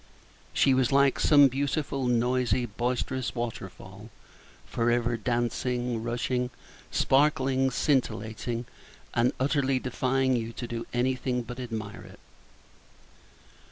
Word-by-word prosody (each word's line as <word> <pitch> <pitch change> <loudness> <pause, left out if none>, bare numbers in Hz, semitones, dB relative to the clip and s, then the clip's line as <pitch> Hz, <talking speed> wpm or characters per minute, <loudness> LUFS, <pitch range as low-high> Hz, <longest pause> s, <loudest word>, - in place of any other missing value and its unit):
She 135 - +3
was 130 -1 +2
like 140 0 +4
some 145 -2 +7
beautiful, 135 0 -1
noisy, 125 0 +1
boisterous 125 +3 -2
water 120 -5 -4
fall, 95 +4 -13 0.6
for 115 0 0
ever 120 0 +1
dancing, 120 +1 -1
rushing, 125 +2 -1 0.4
sparkling, 135 -1 +2
scintillating, 120 -3 -1 0.5
and 120 +1 +3
utterly 135 -1 +1
defying 130 +1 0
you 115 -1 -3
to 120 - -5
do 115 -1 -5
anything 125 0 0
but 120 +2 -8
admire 110 -4 -5
it. - - -14
125 Hz, 110 wpm, -28 LUFS, 120-130 Hz, 0.6 s, some